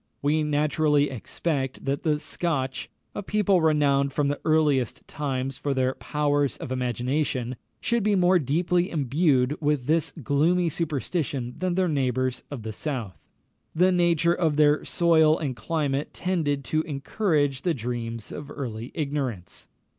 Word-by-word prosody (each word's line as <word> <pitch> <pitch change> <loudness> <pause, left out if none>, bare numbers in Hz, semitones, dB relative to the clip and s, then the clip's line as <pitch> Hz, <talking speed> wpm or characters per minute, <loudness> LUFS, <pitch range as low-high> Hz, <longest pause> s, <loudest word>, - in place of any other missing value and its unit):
We 150 +2 +2
naturally 150 -1 +2
expect 135 +2 -3
that 140 +1 -1
the 155 -2 +1
Scotch 140 -6 -2 0.2
a - - -4
people 200 -2 +2
renowned 145 -3 +3
from 145 -1 +1
the 145 - -2
earliest 150 -6 +1
times 135 -2 -3
for 140 -2 -1
their 130 0 +1
powers 145 -3 0
of - - -7
imagination 125 0 -1 0.2
should 235 0 0
be 210 0 +2
more 180 0 +4
deeply 175 +5 +1
imbued 145 -2 +2
with 145 -4 +1
this 160 +3 +1
gloomy 165 +7 +2
superstition 145 -5 -2
than 185 -1 -1
their 185 0 +2
neighbours 130 -4 0
of 135 -6 -6
the 110 0 -5
south. 115 - -4 0.6
The 180 +3 +4
nature 170 -1 +3
of 160 -4 +1
their 150 0 +4
soil 160 -2 +4
and 140 -5 -3
climate 145 -2 -2
tended 160 -7 -1
to 155 +5 +1
encourage 145 -2 0
the 175 -3 0
dreams 115 -2 -5
of 150 -1 -7
early 120 -5 -6
ignorance. 140 - -4
145 Hz, 145 wpm, -26 LUFS, 130-165 Hz, 0.6 s, more